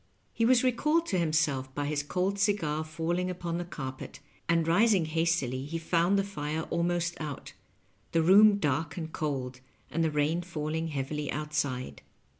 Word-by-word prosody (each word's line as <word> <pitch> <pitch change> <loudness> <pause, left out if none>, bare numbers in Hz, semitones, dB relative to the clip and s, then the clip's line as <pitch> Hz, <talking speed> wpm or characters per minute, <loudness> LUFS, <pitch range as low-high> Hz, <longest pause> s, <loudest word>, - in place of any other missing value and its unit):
He 230 - +1
was 245 +1 +5
recalled 300 +7 +2
to 185 - +1
himseK 145 -5 0
by 145 - -1
his 145 0 -1
cold 185 +7 -1
cigar 195 -7 +1
falling 165 +3 -2
upon 175 -1 -3
the - - -2
carpet, 130 -6 -7 0.3
and 165 -1 +2
rising 195 0 +4
hastily 155 -5 0
he 165 +3 -4
found 170 +4 +2
the 195 - +2
fire 155 -5 -4
al 170 - +1
most 175 0 0
out, 150 -3 -6 0.6
the 165 -1 +2
room 200 +4 +7
dark 150 -2 -1
and 160 -2 -5
cold, 130 -4 -3 0.3
and 165 +1 0
the 160 - +2
rain 150 +3 +1
falling 160 -2 -3
heavily 145 0 -3
outside. 145 -4 -3
160 Hz, 165 wpm, -29 LUFS, 150-180 Hz, 0.6 s, room